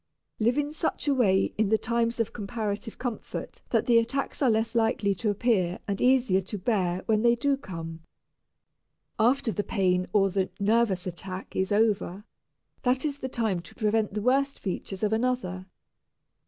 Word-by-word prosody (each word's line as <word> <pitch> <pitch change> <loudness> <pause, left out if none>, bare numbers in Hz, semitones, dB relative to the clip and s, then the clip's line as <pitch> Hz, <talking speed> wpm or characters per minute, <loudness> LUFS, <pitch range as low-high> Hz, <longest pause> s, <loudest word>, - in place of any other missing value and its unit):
Live 235 +4 +2
in 295 0 0
such 310 0 -2
a 285 - +4
way 195 -7 +2
in 220 -2 +3
the 220 - +4
times 235 +1 0
of 230 - -1
comparative 215 0 -4
comfort 245 -3 -5
that - - +2
the 235 -2 +5
attacks 270 +6 -2
are 265 - +4
less 220 +1 +1
likely 225 -3 +2
to 210 +3 -2
appear 200 -4 +1
and 200 -1 -2
easier 245 -7 +4
to 195 +3 -6
bear 185 -3 0
when 215 -2 +2
they 235 +1 +4
do 280 +4 +1
come. 165 -10 -7 1.2
After 240 +2 +3
the 205 - -2
pain 185 -3 +1
or 195 -1 +3
the 190 0 0
"nervous" 205 -3 +2
attack 185 +1 -6
is 190 +1 0
over, 205 -2 +1 0.6
that 255 +3 +1
is 285 -2 -2
the 260 - -4
time 220 -7 0
to 170 - -13
prevent 215 -2 0
the 210 - -2
worst 275 +3 +2
features 195 +1 -5
of 210 0 +2
another. 220 -6 -1
220 Hz, 170 wpm, -27 LUFS, 195-240 Hz, 1.2 s, the